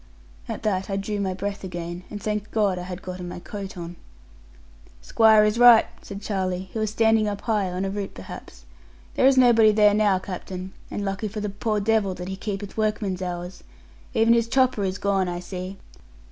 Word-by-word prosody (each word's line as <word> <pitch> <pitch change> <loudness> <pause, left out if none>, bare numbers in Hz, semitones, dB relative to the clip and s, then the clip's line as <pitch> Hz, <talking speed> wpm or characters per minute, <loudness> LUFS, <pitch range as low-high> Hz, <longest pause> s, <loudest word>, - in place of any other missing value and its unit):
At 225 - -5
that 195 -3 -1
I 195 - -1
drew 205 +1 -3
my 190 -2 -1
breath 200 +1 -4
again, 175 -1 -5
and 205 - -6
thanked 210 0 -3
God 205 -5 +1
I 180 +1 -7
had 180 0 -7
gotten 180 -1 -6
my - - -7
coat 195 0 -7
on. 170 0 -7 1.0
'Squire 220 -1 +5
is 210 +2 +1
right,' 240 -2 +8 0.2
said 200 0 -9
Charlie, 190 -2 -2
who 225 - -3
was 215 -1 0
standing 220 0 +3
up 205 -1 -3
high 210 -5 0
(on 185 +2 -2
a - - -1
root 200 -1 -5
perhaps), - - -10 0.5
'there 260 - +4
is 270 -1 +4
nobody 230 -4 +6
there 210 -1 +5
now, 205 -2 +3
captain; 185 0 -7 0.2
and 205 - -4
lucky 195 +2 -2
for 210 +1 -6
the 210 0 -2
poor 210 +2 -1
devil 205 -2 +1
that 180 +1 -6
he 190 - -3
keepeth 200 0 -5
workman's 210 -3 -1
hours. 180 0 -5 0.5
Even 225 0 +5
his 230 -1 +2
chopper 255 -3 +2
is 190 0 -1
gone, 195 -2 0
I 175 0 -3
see.' 185 +1 -6
200 Hz, 200 wpm, -24 LUFS, 185-215 Hz, 1.0 s, right